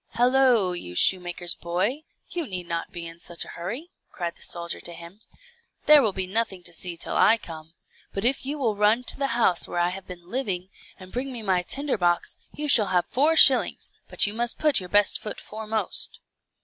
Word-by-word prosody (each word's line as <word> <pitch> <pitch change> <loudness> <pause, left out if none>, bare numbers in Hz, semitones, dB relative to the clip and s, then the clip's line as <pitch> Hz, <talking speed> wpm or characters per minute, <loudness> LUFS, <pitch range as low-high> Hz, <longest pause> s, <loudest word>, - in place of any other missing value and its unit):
"Hallo, 245 -5 +3
you 130 - -6
shoemaker's 175 - +3
boy, 185 - -2 0.3
you 340 -4 -4
need 180 -4 -5
not 170 -1 -4
be 170 -1 -7
in 165 0 -10
such 170 -1 -6
a - - -12
hurry," 245 - -6 0.2
cried 170 -2 -5
the - - -19
soldier 170 0 -2
to 170 - -6
him. 170 +4 -12 0.7
"There 300 -1 +8
will 220 -5 +1
be 190 -1 -3
nothing 195 -2 -1
to 175 - -4
see 170 +1 -4
till - - -5
I 225 - +5
come; 160 -4 -11 0.4
but 195 +3 -4
if 265 +3 +2
you 285 +3 -3
will 235 -7 -1
run 210 +4 +2
to - - +3
the 275 - +1
house 185 -7 +3
where - - -6
I 175 0 +2
have 190 +1 -8
been 175 -1 -11
living, 195 -8 -3 0.3
and 185 -1 -13
bring 265 +2 -3
me 235 -3 -5
my 185 -3 +1
tinder 275 +6 0
box, 175 -1 0 0.2
you 300 0 -4
shall 220 -7 +6
have 180 -1 +1
four 300 +5 +3
shillings, 270 -4 +5 0.2
but - - +3
you 205 - -3
must 235 +1 -1
put 300 -5 +3
your 180 -1 -9
best 205 0 +2
foot 210 - -6
foremost." 220 0 -4
195 Hz, 210 wpm, -25 LUFS, 175-245 Hz, 0.7 s, There